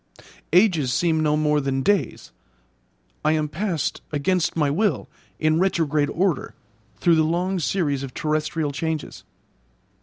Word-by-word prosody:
Ages 170 - +3
seem 160 +5 +1
no 150 -1 +2
more 150 -1 +2
than 135 -1 -1
days! 205 -1 0 0.9
I 155 +1 +3
am 155 -1 0
passed, 165 +1 -2
against 165 +4 0
my 150 -3 +1
will, 205 +6 0 0.3
in 155 +1 +2
retrograde 155 -6 +1
order, 175 -4 -1 0.4
through 170 -2 +4
the 160 - +4
long 180 +4 0
series 150 -5 0
of 135 -2 -7
terrestrial 155 0 -1
changes. 160 +1 -4
155 Hz, 130 wpm, -23 LUFS, 150-175 Hz, 0.9 s, through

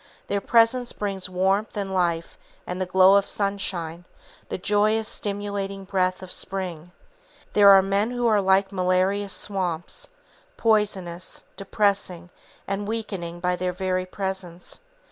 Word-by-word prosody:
Their 200 0 -2
presence 235 +3 +3
brings 195 -3 -4
warmth 195 +4 0
and 195 -1 -3
life 170 -3 -1 0.3
and 180 +1 -4
the 185 - -1
glow 190 +2 +6
of 200 - 0
sunshine, 180 -4 -2 0.4
the - - -3
joyous, 210 +3 +1
stimulating 200 -1 -2
breath 185 -1 -1
of 185 - -9
spring. 180 -3 -3 0.6
There 205 -1 +7
are 195 -1 +8
men 200 +3 +1
who 245 -1 -2
are 215 -3 +4
like 190 +1 +3
malarious 190 +2 +1
swamps, 185 - -1 0.5
poisonous, 195 -6 0
depressing 195 -3 0 0.4
and 195 +1 -3
weakening 195 -6 -4
by 180 0 +1
their 180 0 -2
very 185 0 -2
presence. 190 -2 -5
195 Hz, 130 wpm, -24 LUFS, 185-205 Hz, 0.6 s, are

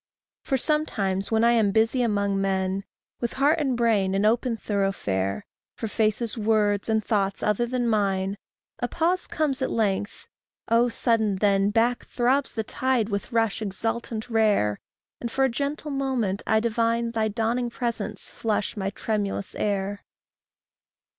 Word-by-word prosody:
For 270 - 0
sometimes 210 - 0
when 225 0 +2
I 235 - +5
am 225 -4 +3
busy 225 +4 +2
among 200 -4 +1
men, 190 0 -1 0.3
With 240 - -2
heart 290 +5 +3
and 270 -5 0
brain 210 -5 +2
an 200 +2 +2
open 230 +2 +2
thoroughfare 105 - -1 0.3
For 225 - -4
faces, 215 +2 0
words, 210 -2 +1
and 220 -1 +1
thoughts 200 -3 0
other 210 +3 +1
than 245 0 -1
mine, 195 -3 +1
And 200 - -7 0.4
a 245 - 0
pause 345 +6 0
comes 285 -4 -1
at 260 - 0
length 205 -1 -1 0.4
oh, 235 +2 +4
sudden 225 -3 +1
then, 195 0 +2
Back 235 +3 +1
throbs 260 +3 +1
the 220 - -3
tide 250 -1 0
with 200 +4 -3
rush 225 -2 +1
exultant 220 +2 -3
rare; 210 - +2 0.4
And 235 - -4
for 270 - +1
a 265 - +4
gentle 285 +4 -3
moment 260 -8 -1
I 220 - +4
divine 230 +1 0
Thy 220 -1 0
dawning 230 +3 -1
presence 225 -4 -4
flush 215 -3 -1
my 195 -2 -2
tremulous 205 -1 -2
air. 200 -1 -2
220 Hz, 155 wpm, -25 LUFS, 200-240 Hz, 0.4 s, I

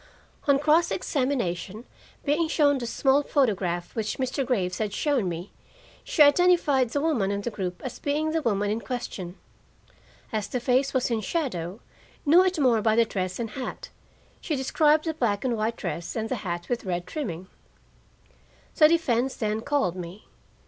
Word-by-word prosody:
On 280 -1 +5
cross 310 +4 +3
examination, 235 - -2 0.4
being 305 +3 +2
shown 290 -3 +3
the 240 - -4
small 270 +4 +2
photograph 195 - 0
which 220 -2 -2
Mr. 260 +1 -1
Graves 190 -8 -1
had 210 -2 -2
shown 270 -11 +1
me, 170 +3 -6 0.5
she - - +4
identified 290 -4 +4
the 285 - -1
woman 280 -12 +1
in 200 0 -1
the 240 - -3
group 180 -4 -4
as 255 - -6
being 300 +2 -1
the 325 0 0
woman 205 -5 0
in 220 - -1
question. 195 -5 -5 1.0
As 210 -2 -1
the 250 - -2
face 255 +3 +2
was 255 -2 0
in 225 -2 0
shadow, 200 - -3 0.4
knew 335 +5 +7
it 370 -1 0
more 250 -7 +3
by 220 0 +2
the 230 0 +4
dress 185 -4 -3
and 230 -2 -4
hat: 260 -2 -6 0.5
she 310 - -2
described 300 +3 +2
the 320 - -1
black 230 -7 -1
and 245 -2 +1
white 220 +1 -1
dress 175 -3 -4
and 225 -1 -2
the 255 - -1
hat 175 -4 -4
with 240 -1 -2
red 175 -3 -3
trimming. 185 - -5 1.3
The 305 - +6
defense 265 -6 +1
then 215 0 -2
called 280 -10 0
me. 180 +3 -8
240 Hz, 170 wpm, -26 LUFS, 200-285 Hz, 1.3 s, knew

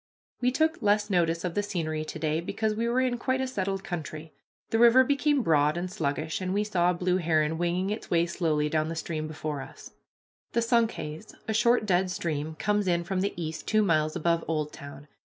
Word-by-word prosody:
We 250 - +3
took 315 +4 +1
less 210 0 +2
notice 170 -2 +1
of 175 - -2
the 205 - +1
scenery 165 -6 -2
to 155 - -6
day, 155 +1 0
because 215 +4 -1
we 230 +2 -1
were 250 +2 +2
in 250 -2 0
quite 260 +2 0
a 265 - 0
settled 195 -6 -2
country. 155 -3 -6 0.4
The 225 - +2
river 240 +2 +7
became 285 0 +2
broad 150 -2 +3
and 180 +1 -3
sluggish, 155 -2 -2
and 185 +1 -2
we 205 - +2
saw 180 -4 +1
a - - +2
blue 180 +1 +1
heron 160 -2 +1
winging 180 +3 0
its 215 - -5
way 170 0 +3
slowly 160 -4 0
down 155 +1 0
the 165 - -4
stream 160 -1 -3
before 155 -2 -4
us. - - -11 0.6
The 235 - +2
Sunkhaze, 225 -7 -1
a 220 - 0
short 235 +1 +3
dead 185 -2 +2
stream, 155 -3 -3
comes 210 +3 0
in 170 -1 +2
from 185 +2 -2
the 200 - -1
east 160 -1 -5
two 215 -1 +3
miles 155 -5 +1
above 170 +1 +1
Oldtown. 145 -2 -5
175 Hz, 205 wpm, -28 LUFS, 155-215 Hz, 0.6 s, river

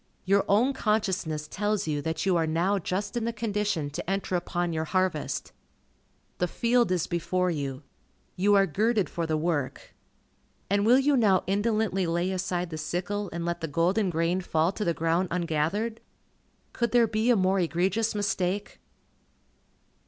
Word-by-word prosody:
Your 195 +1 +3
own 235 +7 +3
consciousness 190 - -1
tells 210 +3 -1
you 150 -2 -1
that 160 +4 -2
you 190 -2 +3
are 165 -1 +1
now 175 +6 +1
just 195 +5 -3
in 240 - -1
the 235 - 0
condition 210 -8 -2
to 150 - -5
enter 195 -1 -1
upon 175 -1 -1
your 160 0 -1
harvest. 185 -2 -1 0.9
The 180 - +1
field 235 +1 +2
is 180 -3 +1
before 180 +2 0
you. 140 -3 -4 0.5
You 205 +3 +3
are 195 0 +5
girded 210 +4 0
for 170 -1 -2
the 155 -1 0
work. 155 -4 -2 0.8
And 200 +1 +2
will 245 +2 +7
you 280 +1 +3
now 205 -7 +3
indolently 205 -2 0
lay 175 +3 0
aside 180 -2 -2
the 155 - -5
sickle, 185 +5 -3
and 170 0 -4
let 170 0 -2
the 165 - -2
golden 180 +7 +1
grain 170 +2 0
fall 165 -1 +1
to 210 - -4
the 170 -3 0
ground 165 +3 +1
ungathered? 180 +7 -1 0.7
Could 235 0 -1
there 240 -1 +6
be 220 +2 0
a 245 - +6
more 190 -1 +2
egregious 185 +6 0
mistake? 200 -1 -1
185 Hz, 165 wpm, -27 LUFS, 165-210 Hz, 0.9 s, will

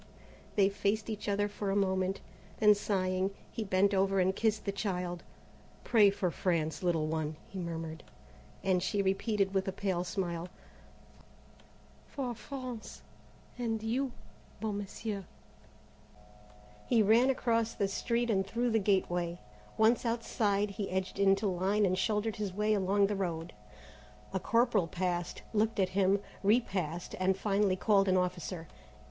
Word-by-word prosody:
They 200 -2 +5
faced 205 +2 -1
each 210 -1 -4
other 205 +1 +1
for 205 -1 -4
a 195 - +1
moment. 190 -1 +1 0.4
Then 210 -1 +7
sighing, 190 -2 0 0.2
he 225 - -3
bent 195 0 +2
over 195 0 +2
and 190 +1 +2
kissed 220 0 0
the 200 - 0
child. 180 -3 -3 0.6
"Pray 215 -4 +6
for 190 -3 -1
France, 165 -3 -1
little 170 -4 +1
one," 155 -1 -2
he 195 - -7
murmured, 165 -2 -5 0.6
and 185 -2 +2
she 200 +2 0
repeated 195 0 +1
with 190 0 0
a - - 0
pale 185 -2 -1
smile: 175 -2 -3 1.6
"For 255 -4 -3
France 250 -1 -7 0.6
and 225 -2 -1
you, 250 +4 0 0.5
beau 220 -1 -2
Monsieur." 205 0 -4 1.6
He 230 -3 +4
ran 230 +5 +5
across 230 -3 +1
the 200 - +1
street 235 +4 0
and 195 -2 +1
through 235 +3 0
the 225 - +3
gateway. 180 -4 0 0.4
Once 220 +2 +4
outside, 215 -3 0
he 200 0 -4
edged 190 +1 -2
into 195 +1 +4
line 195 +2 +2
and 185 -1 +2
shouldered 210 +2 0
his 205 -2 -2
way 210 +3 +1
along 200 0 +3
the 205 +1 -1
road. 170 -3 -3 0.8
A 190 - 0
corporal 230 -4 +2
passed, 175 0 -2
looked 220 0 +1
at 185 -1 +3
him, 195 +1 +3 0.2
repassed, 190 -6 0
and 185 0 +2
finally 200 -1 +2
called 195 +1 +3
an 185 0 +4
officer. 180 -2 -2
195 Hz, 145 wpm, -32 LUFS, 185-215 Hz, 1.6 s, Then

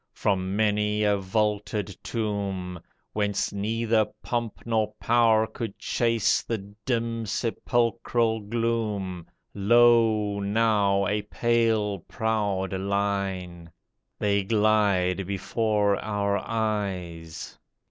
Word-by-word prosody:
From 95 -1 0
many 105 0 +1
a 105 -1 +3
vaulted 105 0 -1
tomb. 100 -5 -3 0.3
Whence 105 -1 -1
neither 110 +2 +1 0.2
pomp 120 -3 -3
nor 110 -2 +1
power 115 -2 +4
could 110 -2 -6
chase 115 -3 +1
The 115 - -2 0.3
dim, 115 -2 -1
sepulchral 115 +1 0
gloom, 105 -5 -2 0.3
Lo, 110 -1 +4
now, 100 -1 +2
a 105 +2 0
pale, 110 -2 +1
proud 105 -4 -1
line. 95 -3 -2 0.5
They 100 -1 +1
glide 100 -3 +2
before 100 +1 +1
our 100 -1 0
eyes 95 -7 -3
105 Hz, 90 wpm, -26 LUFS, 100-115 Hz, 0.5 s, power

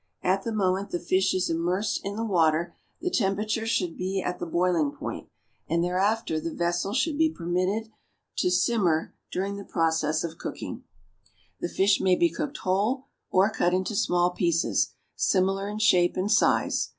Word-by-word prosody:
At 190 +2 +2
the 230 - -4
moment 195 -2 0
the 175 - -2
fish 185 +2 +1
is 185 - +1
immersed 175 +5 -1
in 200 +1 -4
the 225 +1 -2
water 170 -3 +2 0.3
the 360 +1 -1
temperature 215 - 0
should 180 -7 0
be 190 +1 -2
at 180 -1 -3
the 175 - -4
boiling 170 -3 +1
point, - - -7 0.4
and 170 +1 +1
thereafter 190 0 0
the 165 +1 -4
vessel 175 +3 -1
should 300 +3 0
be 320 0 +4
permitted 185 - -1 0.5
to - - +2
simmer 180 -3 +1 0.2
during 195 +2 -2
the 200 - -7
process 160 -4 0
of 165 -1 -6
cooking. - - -6 0.7
The 175 - -3
fish 195 +2 +2
may 185 -1 +4
be 340 - +2
cooked 300 -1 -4
whole, 210 +8 0 0.2
or 195 +3 +3
cut 180 -2 +1
into 185 +4 -1
small 175 -2 +2
pieces, 170 -2 +1 0.2
similar 195 +1 +1
in 210 - -5
shape 185 -6 +3
and 195 +3 0
size. - - +2
185 Hz, 170 wpm, -26 LUFS, 175-210 Hz, 0.7 s, be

